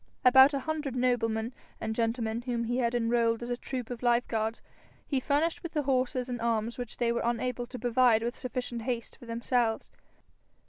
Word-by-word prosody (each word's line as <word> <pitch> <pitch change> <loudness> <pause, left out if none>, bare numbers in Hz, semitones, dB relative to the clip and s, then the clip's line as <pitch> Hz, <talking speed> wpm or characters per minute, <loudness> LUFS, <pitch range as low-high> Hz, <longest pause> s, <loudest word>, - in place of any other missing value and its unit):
About 265 +2 +8
a 275 - -1
hundred 300 -2 -3
noblemen 235 -2 0 0.3
and 220 - -2
gentlemen 230 0 -1
whom 240 -1 -2
he 240 +2 -1
had 235 -1 +1
enrolled 230 0 +1
as 240 - -4
a - - +1
troop 250 -1 -5
of 240 - -5
life 240 0 +2
guards, 225 0 -1 0.5
he 275 - 0
furnished 315 +9 0
with 340 -4 -7
the 300 -2 0
horses 255 -1 0
and 245 -2 -4
arms 230 0 -1
which 245 -3 -5
they 235 -1 +1
were 235 - 0
unable 240 +1 -1
to 250 - -7
provide 240 -1 +3
with 240 +2 -2
sufficient 245 -1 -4
haste 235 -1 -3
for 240 - -14
themselves. 230 0 0
240 Hz, 190 wpm, -29 LUFS, 230-255 Hz, 0.5 s, About